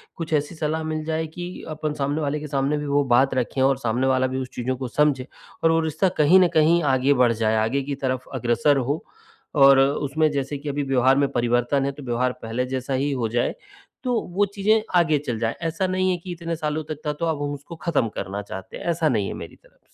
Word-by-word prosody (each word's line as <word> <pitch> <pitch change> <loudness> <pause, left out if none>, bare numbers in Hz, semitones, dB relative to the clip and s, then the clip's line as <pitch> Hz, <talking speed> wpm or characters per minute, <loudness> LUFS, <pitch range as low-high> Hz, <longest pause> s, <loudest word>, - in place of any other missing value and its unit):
कुछ 165 -1 -5
ऐसी 150 +3 0
सलाह 160 0 -2
मिल 155 0 -3
जाए 160 0 -1
कि 175 +3 -7 0.2
अपन 155 -1 -3
सामने 145 +1 -1
वाले 150 0 -1
के 150 - -6
सामने 140 +1 0
भी 150 - -4
वो 145 0 +2
बात 135 +2 +3
रखें 130 +1 -1
और 135 0 +3
सामने 125 +1 0
वाला 130 0 +2
उस 130 - -6
चीज़ों 130 +2 -2
को 130 0 -4
समझे 135 0 +1 0.4
और 165 - +5
वो 165 - +3
रिश्ता 160 +4 +1
कहीं 155 +5 +6
न 185 - +5
कहीं 160 +2 +4
आगे 135 0 +3
बढ़ 125 -3 +3
जाए। 110 -1 +1
आगे 115 +6 +1
की 140 +1 -3
तरफ 130 -2 -2
अग्रसर 120 +3 +2
हो 140 +4 -1 0.5
और 135 -1 +7
उसमें 145 +3 +2
जैसे 140 0 -2
कि 145 +1 -6
अभी 145 0 -1
व्यवहार 135 -1 +3
में 140 0 +3
परिवर्तन 120 +3 +1
है 140 - 0
तो 140 +1 -11
व्यवहार 125 0 0
पहले 115 +3 -2
जैसा 130 +1 -3
ही 140 +2 0
हो 125 -4 -1
जाए 120 +2 0 0.5
तो 250 -3 +1 0.2
वो 205 +1 +4
चीज़ें 215 +2 +3
आगे 165 -4 +4
चल 120 -4 -2
जाएँ। 115 0 -1
ऐसा 165 +4 -1
नहीं 185 0 +1
है 180 - 0
कि 180 +1 -8
इतने 170 -1 -4
सालों 155 0 -2
तक 155 -1 -5
था 150 - 0
तो 170 +3 -3
अब 160 -3 -1
हम 145 0 -2
उसको 145 +4 -9
ख़त्म 160 -7 0
करना 100 +1 -4
चाहते 95 -2 -8
हैं। - - -9
ऐसा 165 -2 +1
नहीं 105 -7 0
है - - -4
मेरी - - -9
तरफ़ - - -26
से। - - -33
145 Hz, 240 wpm, -23 LUFS, 130-155 Hz, 0.5 s, और